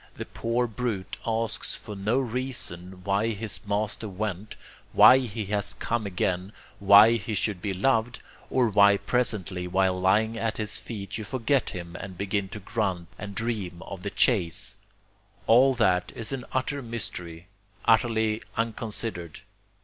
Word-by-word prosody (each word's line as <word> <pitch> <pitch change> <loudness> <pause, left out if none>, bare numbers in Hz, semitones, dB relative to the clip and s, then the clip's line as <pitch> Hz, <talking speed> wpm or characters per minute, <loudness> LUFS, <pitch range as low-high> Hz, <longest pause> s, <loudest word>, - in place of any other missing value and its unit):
the - - -6
poor 115 +2 -1
brute 115 -4 -3
asks 115 -1 -1
for 105 - -9
no 105 +5 0
reason 115 -8 -3
why 100 +3 +1
his 110 -1 -2
master 105 +1 -1
went, 100 +1 -4 0.4
why 130 - +8
he 115 -4 -4
has 100 0 -1
come 115 -3 -2
again, 90 0 -1 0.3
why 100 +4 +7
he 110 0 -4
should 100 -3 -1
be 100 - -2
loved, 115 +4 +1 0.3
or 125 -2 +2
why 100 -1 +5
presently 100 -7 -1
while 95 0 +1
lying 110 +4 +2
at 115 -1 -1
his 105 -2 0
feet 105 -2 -6
you - - -4
forget 130 +4 0
him 85 -1 -7
and 95 -2 -8
begin 100 0 -1
to 105 - -7
grunt 95 -5 -2
and 100 0 -7
dream 105 -6 -2
of 95 -2 -8
the 100 - -3
chase 95 -8 +1 0.7
all 130 +4 +5
that 90 -7 +2
is 115 - -3
an 130 -2 -4
utter 140 +2 -1
mystery, 90 -8 -6 0.4
utterly 110 -1 +2 0.2
unconsidered. 110 -6 -2
105 Hz, 150 wpm, -26 LUFS, 95-115 Hz, 0.7 s, why